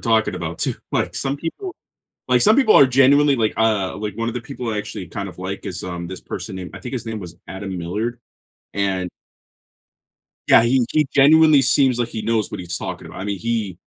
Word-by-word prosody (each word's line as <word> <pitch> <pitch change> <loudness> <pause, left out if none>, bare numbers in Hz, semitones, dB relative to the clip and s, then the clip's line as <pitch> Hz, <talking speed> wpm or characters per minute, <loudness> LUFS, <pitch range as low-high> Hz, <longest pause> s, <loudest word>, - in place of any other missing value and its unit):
talking 110 -4 +1
about, 85 -2 -5
too. - - 0 0.2
Like, - - 0
some 135 +1 -2
people 350 - -6 0.5
like, - - +4
some 215 +1 +5
people 250 -6 +5
are 140 - +8
genuinely 135 +2 +4
like, 110 -3 +1
uh 110 -4 +1
like, 105 -1 -5
one 115 0 -2
of 120 - -4
the 125 - -3
people 125 -2 -6
I 105 - -2
actually 95 -3 -6
kind 100 +3 -5
of 90 - -12
like 95 +2 -5
is, 90 -2 -5
um, 85 -1 -5
this 95 +1 -8
person 95 - -6
named 90 -1 -7
I - - -9
think 125 - -7
his 120 -3 -4
name 110 -1 -4
was 85 -2 -10
Adam 95 -1 -6
Millard, 105 +8 -3 0.6
and 95 -2 -1 1.4
Yeah, - - +7
he 125 +2 +3
he 155 -2 +3
genuinely 150 +1 +6
seems 130 -1 +3
like 120 - 0
he 110 - -5
knows 110 -1 0
what - - -5
he's 90 0 -4
talking - - -6
about. - - -9
I - - -4
mean, 100 -1 -3
he 110 -6 -2
110 Hz, 220 wpm, -21 LUFS, 95-130 Hz, 1.4 s, are